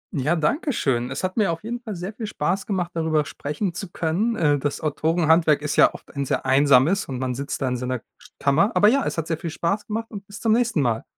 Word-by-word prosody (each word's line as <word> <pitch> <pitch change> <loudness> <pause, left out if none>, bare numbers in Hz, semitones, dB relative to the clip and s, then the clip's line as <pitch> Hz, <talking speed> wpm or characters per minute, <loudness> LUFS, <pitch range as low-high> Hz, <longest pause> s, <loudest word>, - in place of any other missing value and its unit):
Ja, 150 +5 +1
danke 275 - 0
schön. 125 - 0
Es 135 +6 -5
hat 185 +4 -2
mir 205 -5 +3
auf 165 +2 -5
jeden 240 +2 -4
Fall 220 -4 -6
sehr 180 +4 -5
viel 220 0 -5
Spaß 190 +1 -2
gemacht, 180 -4 -1
darüber 160 -2 +1
sprechen 150 +7 -4
zu 195 +1 -6
können. 190 +10 0
Äh, 145 -6 +2
das 145 +1 -2
Autorenhandwerk 160 0 +2
ist 150 0 -2
ja - - +6
oft - - -14
ein 140 - -1
sehr - - -2
Einsames 140 +7 +4
und 130 - -4
man 130 0 -2
sitzt 140 +3 -4
da - - +1
in 125 0 -1
seiner 125 0 -3 0.4
Kammer. 160 - +3
Aber 210 - +6
ja, 275 +4 +2
es - - -3
hat 165 - -1
sehr 160 -1 -2
viel 165 - -4
Spaß 200 +7 -2
gemacht 225 +2 -4
und 200 -2 -8
bis 205 0 -10
zum 225 - +1
nächsten 235 -8 +2
Mal. 115 -3 0
165 Hz, 245 wpm, -23 LUFS, 140-205 Hz, 0.4 s, ja